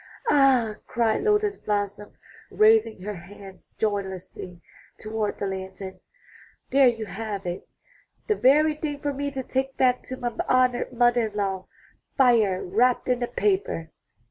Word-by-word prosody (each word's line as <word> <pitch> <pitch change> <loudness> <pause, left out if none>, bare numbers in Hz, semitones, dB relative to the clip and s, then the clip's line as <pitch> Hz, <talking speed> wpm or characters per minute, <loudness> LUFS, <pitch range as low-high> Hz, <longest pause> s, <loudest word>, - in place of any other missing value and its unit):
''Ah," 255 -6 +4
cried 230 - +1
Lotus 420 -1 +1
blossom, 205 0 -3 0.4
raising 430 - +3
her 210 +1 -4
hands 190 +1 -13
joyously 190 -4 -4 0.4
toward 215 -1 -3
the - - -3
lantern, 190 0 -6 0.7
'There 270 -1 +6
you 225 -2 0
have 205 -1 -5
it! 175 0 -5 0.6
The 430 - +2
very 305 -1 +4
thing 295 -1 -5
for 290 0 -2
me 285 +1 -3
to 270 -2 -5
take 265 +1 -2
back 250 -1 +3
to 260 - -6
my 240 -2 -3 0.2
honored 255 -1 +2
mother 240 -1 +3
in 210 - -12
law 195 -2 -2 0.2
— - - -41
fire 225 -8 +3
wrapped 245 +8 +1
in 250 -1 +1
a 240 - 0
paper." 310 - -1
230 Hz, 145 wpm, -25 LUFS, 200-270 Hz, 0.7 s, There